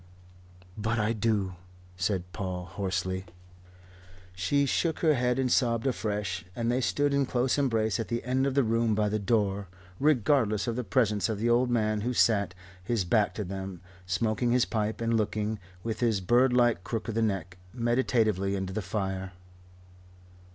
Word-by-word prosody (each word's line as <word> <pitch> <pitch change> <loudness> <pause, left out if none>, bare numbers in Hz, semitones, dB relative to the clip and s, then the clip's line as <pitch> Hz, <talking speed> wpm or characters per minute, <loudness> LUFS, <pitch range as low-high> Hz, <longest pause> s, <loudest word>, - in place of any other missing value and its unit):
"But 110 +2 -1
I 105 +1 +1
do," 105 -4 0 0.4
said 90 0 -1
Paul 90 -3 -4
hoarsely. 95 0 -2 1.1
She 115 +11 +1
shook 160 +4 0
her 160 -2 +4
head 125 -2 +1
and 130 -2 +1
sobbed 115 -2 +2
afresh, 105 -7 -2
and 115 0 0
they 125 +2 +1
stood 145 +3 +1
in 140 -1 +2
close 125 +1 +1
embrace 115 -5 +1
at 115 - -2
the 120 0 -2
end 130 +2 +1
of 135 - -2
the 140 - +4
room 115 -1 +1
by 105 0 +1
the 105 +1 -1
door, 100 -2 0 0.3
regardless 130 -6 +2
of 115 - -2
the 125 - -2
presence 105 -2 +1
of 110 - -1
the 115 +3 +1
old 125 +1 +3
man 110 -3 +1
who 125 +3 -2
sat, 100 -7 +3 0.3
his 110 -1 0
back 105 +3 +2
to 105 - -2
them, 95 -1 -6 0.3
smoking 110 +6 0
his 125 0 +3
pipe 110 0 -2
and 115 0 +1
looking, 105 0 -1 0.2
with 115 -1 -3
his 115 -4 +2
birdlike 120 -1 +3
crook 110 +4 -4
of 115 - -2
the 115 - 0
neck, 95 -5 -2
meditatively 115 -5 +1
into 95 -1 -3
the 110 - -2
fire. 95 -1 -3
110 Hz, 170 wpm, -28 LUFS, 100-120 Hz, 1.1 s, her